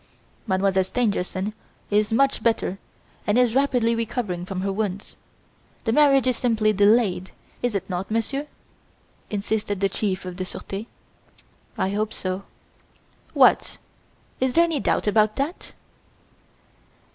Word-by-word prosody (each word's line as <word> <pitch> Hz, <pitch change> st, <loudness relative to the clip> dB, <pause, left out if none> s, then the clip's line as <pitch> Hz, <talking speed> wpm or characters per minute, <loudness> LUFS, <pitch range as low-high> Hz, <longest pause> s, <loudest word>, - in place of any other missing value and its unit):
"Mademoiselle 190 Hz, -1 st, +2 dB
Stangerson 200 Hz, -1 st, -1 dB, 0.4 s
is 210 Hz, +1 st, +2 dB
much 275 Hz, +4 st, +2 dB
better 225 Hz, -4 st, 0 dB, 0.5 s
and 210 Hz, +2 st, +3 dB
is 245 Hz, -2 st, +4 dB
rapidly 250 Hz, -4 st, +2 dB
recovering 225 Hz, -6 st, -3 dB
from 185 Hz, -1 st, -3 dB
her 195 Hz, 0 st, -1 dB
wounds. 200 Hz, -1 st, -3 dB, 0.7 s
The 225 Hz, -, 0 dB
marriage 275 Hz, -2 st, +5 dB
is 255 Hz, -1 st, +2 dB
simply 220 Hz, -3 st, +2 dB
delayed, 205 Hz, -2 st, +3 dB, 0.3 s
is 245 Hz, -3 st, -1 dB
it 190 Hz, -1 st, -2 dB
not, 185 Hz, 0 st, -4 dB
Monsieur?" 250 Hz, +6 st, -1 dB, 0.8 s
insisted 205 Hz, -1 st, -2 dB
the 195 Hz, 0 st, +2 dB
Chief 190 Hz, -1 st, -2 dB
of 180 Hz, -1 st, -6 dB
the 185 Hz, -, -2 dB
Surete. 195 Hz, +3 st, -6 dB, 0.9 s
"I 190 Hz, -, 0 dB
hope 215 Hz, +1 st, -1 dB
so. 185 Hz, +1 st, -4 dB, 0.9 s
"What! -, -, +4 dB, 0.6 s
Is 260 Hz, -1 st, +1 dB
there 335 Hz, -, +6 dB
any 330 Hz, -4 st, 0 dB
doubt -, -, 0 dB
about 215 Hz, 0 st, +3 dB
that?" 290 Hz, +6 st, -4 dB
215 Hz, 130 wpm, -24 LUFS, 195-245 Hz, 0.9 s, there